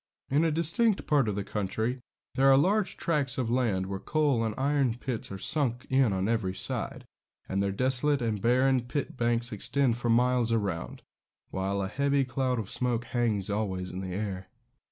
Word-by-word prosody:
In 145 +4 +3
a 165 - +3
distant 170 +8 +3
part 145 -6 +2
of 105 - -1
the 100 - -2
country 110 +6 -2 0.3
there 135 +1 +4
are 135 - +6
large 190 +5 +1
tracts 145 -6 0
of 120 -3 -1
land 115 -7 +1
where 95 0 -4
coal 145 -5 +1
and 110 -2 -2
iron 135 -3 +1
pits 120 -3 -5
are 95 - -5
sunk 125 +2 -1
on 105 -8 +2
every 110 -5 -1
side, - - -4 0.4
and 95 +1 -1
their 100 0 0
desolate 130 +6 +1
and 110 -5 -2
barren 130 +3 +3
pit 140 +2 -3
banks 120 -1 0
extend 120 +3 +1
for 120 0 -2
miles 120 0 +3
round, 100 -7 -2 0.5
while 95 +1 -1
a - - -2
heavy 140 +5 +1
cloud 130 0 -1
of 110 -3 -4
smoke 120 -1 -1
hangs 110 -5 0
always 95 -3 -2
in 95 - -5
the 95 -1 -5
air. 95 -2 -4
120 Hz, 180 wpm, -28 LUFS, 100-135 Hz, 0.5 s, are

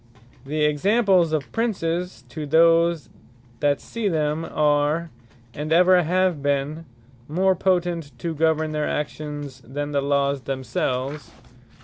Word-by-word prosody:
The 150 +1 0
examples 185 +2 +3
of 145 -6 -2
Princes, 180 - -2
to 150 +4 -6
those 165 -1 +3 0.5
that 145 -1 +2
see 230 -3 -3
them, 155 -1 0
are, 150 +2 +1 0.4
and 150 +2 -5
ever 180 +2 +6
have 180 -1 +1
been, 145 +3 -1 0.4
more 185 +5 +2
potent 175 -7 -1
to 165 +5 -3
govern 160 0 +1
their 150 -1 -1
actions, 145 -2 -5
than 145 +2 -5
the 140 -1 +1
Lawes 140 0 +1
themselves. 130 +1 -3
155 Hz, 120 wpm, -23 LUFS, 145-170 Hz, 0.5 s, ever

